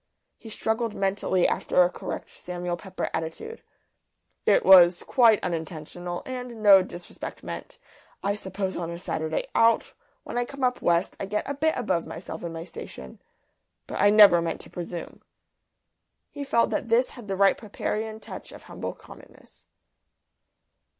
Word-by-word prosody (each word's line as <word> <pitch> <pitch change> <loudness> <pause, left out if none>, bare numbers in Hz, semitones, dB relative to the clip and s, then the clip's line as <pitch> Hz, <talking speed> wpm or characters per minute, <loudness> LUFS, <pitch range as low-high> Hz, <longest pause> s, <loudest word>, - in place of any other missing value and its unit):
He 225 - -11
struggled 220 +1 -2
mentally 195 -2 +1
after 180 - +3
a 175 - +2
correct - - -6
Samuel 175 0 -5
Pepper 185 +2 -5
attitude. 165 - -5 0.9
"It - - +4
was 180 -2 +8
quite 230 -5 +5
unintentional, 175 +1 -5
and 250 -3 -6
no 200 -2 +9
disrespect 180 -1 -8
meant. - - -7 0.5
I 200 - +1
suppose 190 -1 -4
on 170 -1 -3
a 170 - -5
Saturday 160 -2 -2
out, 230 0 +3 0.3
when 240 - -3
I 245 - 0
come 275 +1 -8
up 250 0 +1
West, 170 +2 +1
I 195 - -4
get 210 +1 -2
a 280 - -2
bit 315 +3 +1
above 175 -9 -1
myself 170 - -7
and 170 - -5
my 165 0 -6
station. 65 - -10 0.7
But - - -4
I 205 - +6
never 205 -5 +8
meant 165 - -3
to - - -15
presume." 175 -1 -7 1.1
He 285 - -6
felt 235 -4 +2
that - - -2
this 235 +3 +2
had 240 -4 -11
the 195 - -2
right 195 0 +4
Pepperian 215 0 -4
touch - - -9
of - - -12
humble - - -6
commonness. - - -17
195 Hz, 155 wpm, -26 LUFS, 175-230 Hz, 1.1 s, no